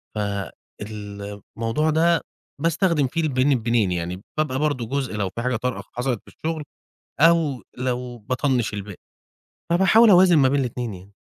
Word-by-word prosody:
فالموضوع 105 +4 -4
ده 165 +2 +3 0.4
باستخدم 165 -3 +2
فيه 165 +6 -2
البين 135 -3 +2
بينين، 115 -4 +1
يعني 90 +1 -3 0.2
بابقى 140 -4 0
برضه 145 -5 0
جزء 135 -3 -2
لو 100 -3 -1
في 115 - -6
حاجة 125 0 0
طارئة 125 +2 -3
حصلت 125 -2 -1
في - - -40
الشُغل 160 -1 -3 0.6
أو 160 -5 +4 0.2
لو 125 -1 -3
باطَنّش 125 0 -1
الباقي، 100 -2 -6 0.7
فباحاول 190 +6 +6
أوازن 180 -2 +7
ما 135 -2 +5
بين 140 +1 +2
الاتنين 120 -3 -3
يعني. 95 +2 -14
125 Hz, 145 wpm, -23 LUFS, 105-155 Hz, 0.7 s, أوازن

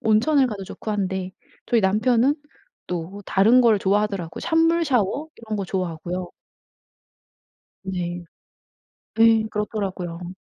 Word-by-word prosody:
온천을 260 +6 +3
가도 205 -5 -5
좋고 215 - -7
한데 190 -2 -2 0.4
저희 235 -3 +2
남편은 230 +7 +3 0.5
또 180 +3 -5
다른 220 +6 +5
걸 225 -4 +4
좋아하더라고요. 195 -3 -1
찬물 330 +1 +2
샤워 255 +3 0
이런 220 -2 -5
거 195 - -2
좋아하고요. 180 -1 -3 1.5
네. 175 -2 -4 1.0
예. 225 -1 +6
그렇더라고요. 185 -5 -4
205 Hz, 260 characters per minute, -23 LUFS, 185-230 Hz, 1.5 s, 예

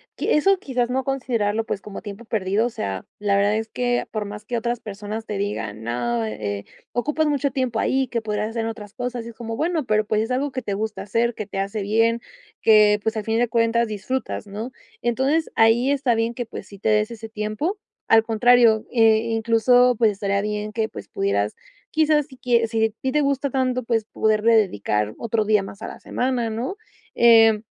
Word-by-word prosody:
qui - - -2
eso, 390 +6 +4
quizás, 250 -7 -1
no 260 +1 0
considerarlo, 230 -5 -1
pues, 200 - -3
como 205 -1 -8
tiempo 205 +1 -8
perdido, 215 0 0
o - - -3
sea, 95 - -4
la 205 -1 +1
verdad 205 +2 +2
es 220 0 -3
que, 245 +2 -1
por 215 -1 -2
más 210 +1 -8
que 240 - -3
otras 235 +1 -1
personas 210 +1 -6
te 210 - -4
digan: 110 - -4
"No, 120 0 -1
eh, 105 -2 -4 0.3
ocupas 300 +7 0
mucho 285 -1 0
tiempo 255 -4 -1
ahí 265 0 +1
que 235 -1 -2
podrías 210 -1 -2
hacer 225 -1 -2
otras 220 -2 -6
cosas", 245 -2 -4
y - - -7
es 230 - -12
como, 225 -1 -5
bueno, 325 +1 0
pero, 215 -1 +2
pues, 215 +1 +1
es 225 +3 -3
algo 270 +2 -1
que 255 - -3
te 205 -4 -3
gusta 215 +2 -3
hacer, 230 +4 0
que 215 - -5
te 200 - -7
hace 200 +2 -2
bien, 225 +3 +2 0.4
que, 210 -1 +6
pues, 220 0 -1
al 215 - -3
fin 225 0 +1
de 240 -1 +1
cuentas 230 0 +2
disfrutas, 215 +2 -4
¿no? 215 +5 -6 0.3
Entonces, 265 +7 +1
ahí 230 +4 +4
está 270 -4 +2
bien 225 +1 0
que, 245 0 -4
pues, 210 - -9
sí 200 - -13
te - - -3
des 215 +1 +2
ese 225 -1 -8
tiempo. 220 - -2 0.3
Al 225 0 +6
contrario, 230 0 +4
eh, 225 -2 +5
incluso, 230 +2 +4
pues, 225 -2 +4
estaría 200 0 -1
bien 210 0 -3
que, 220 0 -1
pues, - - -10
pudieras 400 0 -1 0.4
quizás, 305 -2 +2
si 260 - -14
quie 235 -2 +2
si 225 0 +1
a - - +1
ti 265 - -1
te 300 - +3
gusta 280 0 0
tanto, 255 -1 0
pues, 230 -2 0
poderle 220 +1 +2
dedicar 105 - +1
otro 225 -1 -1
día 210 -1 +3
más 195 +1 -10
a - - -5
la - - -9
semana, 250 -2 -1
¿no?, 235 - -3 0.4
eh, 225 -2 +6
225 Hz, 210 wpm, -23 LUFS, 210-245 Hz, 0.4 s, que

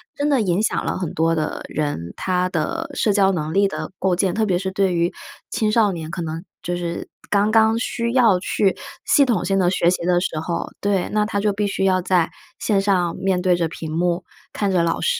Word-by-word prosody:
真 285 - -1
的 275 -5 +3
影 185 -1 +1
响 - - 0
了 - - -2
很 180 -4 -4
多 165 +1 +1
的 155 -1 -2
人， 145 - -3
他 180 -1 0
的 195 - -2
社 210 - +2
交 195 -1 +4
能 160 -3 -2
力 200 +1 +4
的 195 - -5
构 185 -2 +2
建。 185 -1 +1
特 220 +2 +1
别 180 -3 +2
是 190 +1 -3
对 190 -2 +1
于 170 +1 +1 0.4
青 215 -1 +1
少 215 -2 +3
年 160 -2 -6
可 175 - -4
能 165 +2 -5 0.2
就 175 - -2
是， 170 -1 -4 0.2
刚 205 +1 +2
刚 220 0 +4
需 235 0 -2
要 230 -8 +4
去 195 +1 +1 0.3
系 285 - +5
统 215 -9 0
性 195 0 +1
地 175 - +3
学 175 -2 +2
习 180 - -2
的 175 0 +3
时 170 -3 -2
候 170 +2 -3
对， 200 -3 +1
那 210 0 +3
他 205 -1 -2
就 205 0 +1
必 205 +1 -1
须 195 -1 -1
要 185 -1 +3
在 180 -2 +1 0.3
线 200 -2 +1
上 180 -4 +1
面 190 -1 0
对 180 -1 +3
着 170 -1 0
屏 160 -1 -7
幕， 175 +1 0 0.3
看 200 -2 -1
着 180 -2 +3
老 165 0 0
师。 485 0 +1
185 Hz, 250 characters per minute, -21 LUFS, 170-205 Hz, 0.4 s, 系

